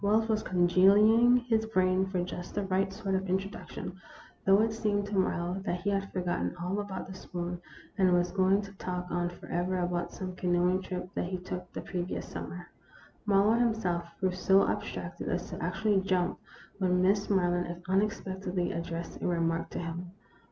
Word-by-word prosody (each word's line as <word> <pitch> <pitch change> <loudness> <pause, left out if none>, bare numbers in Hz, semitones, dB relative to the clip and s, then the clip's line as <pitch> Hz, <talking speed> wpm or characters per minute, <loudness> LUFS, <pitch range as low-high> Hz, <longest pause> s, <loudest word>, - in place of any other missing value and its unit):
Wells 215 +2 +3
was 215 -1 +1
cudgelling 210 +7 +5
his 220 -2 +2
brains 185 -2 +2
for 180 -2 0
just 180 -1 -6
the 205 - 0
right 195 0 +1
sort 195 0 -3
of 190 0 -1
introduction, 190 0 -4 0.4
though 195 +2 +6
it 225 -1 0
seemed 205 -2 0
to 205 0 -4
Marlowe 185 0 0
that 180 -3 -2
he 205 +2 0
had 195 0 -1
forgotten 175 - -1
all 180 +4 -1
about 200 -2 -4
the 190 - -7
spoon, 175 -1 -5 0.4
and 185 -1 +5
was 175 0 +2
going 195 +1 +3
to 200 - -9
talk 180 -1 -3
on 175 0 0
forever 175 +1 -2
about 175 -1 -1
some 185 -1 -6
canoeing 180 +1 +2
trip 180 -1 -5
that - - -1
he 185 +1 -3
took 180 0 -6
the - - -4
previous 180 -1 -4
summer. 180 -1 -7 0.6
Marlowe 205 +3 +4
him 235 -2 +3
self 175 -6 -1
grew 190 -1 +1
so 190 +2 +4
abstracted - - -4
as - - -2
to - - -5
actually 210 -3 +1
jump 185 -1 0 0.4
when 180 -1 +2
Miss 200 +2 +2
Maryland 175 -2 +1
unexpectedly 190 -2 0
addressed 170 0 -5
a - - 0
remark 165 -1 0
to - - -6
him. 170 +1 -4
185 Hz, 180 wpm, -30 LUFS, 175-200 Hz, 0.6 s, though